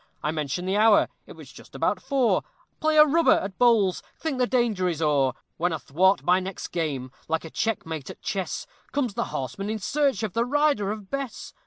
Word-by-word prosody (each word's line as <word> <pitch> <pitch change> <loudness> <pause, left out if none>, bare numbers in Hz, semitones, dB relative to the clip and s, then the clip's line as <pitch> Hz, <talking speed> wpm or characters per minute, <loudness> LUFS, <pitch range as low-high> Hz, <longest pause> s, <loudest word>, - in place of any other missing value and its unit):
I 150 - 0
mention 155 +3 -3
the 190 +2 0
hour 215 0 +5 0.2
it - - -10
was - - -13
just - - -15
about - - 0
four 270 -4 +2 0.4
Play 310 0 +2
a 300 - +9
rubber 325 +3 +4
at 195 -1 -2
bowls 225 -7 +4 0.2
think 300 -5 -3
the 250 - +3
danger 235 -8 +1
is 165 -3 -3
o'er; 145 -5 +2 0.2
When 175 +2 +1
athwart 170 +5 +2
my 180 +1 +4
next 190 0 -6
game, 140 -7 -3 0.2
like 160 +1 -1
a 160 - -9
checkmate 160 - -3
at - - -9
chess, 190 -3 -3 0.3
Comes 260 -7 0
the - - -1
horsemen 195 +10 -4
in 220 - -1
search 270 +1 0
of 210 -5 -2
the 230 - +2
rider 285 -5 +1
of 210 -3 -8
Bess. 275 -3 -5
200 Hz, 200 wpm, -25 LUFS, 165-245 Hz, 0.4 s, a